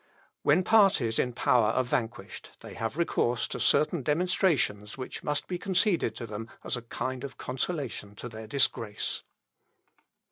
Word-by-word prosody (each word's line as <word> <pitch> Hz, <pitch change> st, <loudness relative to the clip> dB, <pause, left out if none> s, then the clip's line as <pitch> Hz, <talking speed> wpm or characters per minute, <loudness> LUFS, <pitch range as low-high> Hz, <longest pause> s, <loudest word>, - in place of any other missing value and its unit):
When 170 Hz, +6 st, +4 dB
parties 185 Hz, -, +4 dB
in 125 Hz, -, +1 dB
power 120 Hz, -2 st, +3 dB
are 120 Hz, +4 st, +2 dB
vanquished, 120 Hz, -6 st, -4 dB
they -, -, -9 dB
have 115 Hz, +4 st, -3 dB
recourse 125 Hz, -8 st, +1 dB
to -, -, -4 dB
certain 155 Hz, +1 st, +3 dB
demonstrations 150 Hz, -, +1 dB
which 130 Hz, -, -6 dB
must 150 Hz, 0 st, -1 dB
be 180 Hz, -1 st, -4 dB
conceded 190 Hz, -1 st, +1 dB
to 120 Hz, -, -5 dB
them 110 Hz, +1 st, -6 dB
as -, -, -1 dB
a 120 Hz, -, -5 dB
kind 130 Hz, +2 st, -4 dB
of 135 Hz, -2 st, -7 dB
consolation 125 Hz, -, -3 dB
to 120 Hz, -, -7 dB
their 110 Hz, -1 st, -9 dB
disgrace. 115 Hz, -4 st, 0 dB
125 Hz, 150 wpm, -29 LUFS, 115-160 Hz, -, When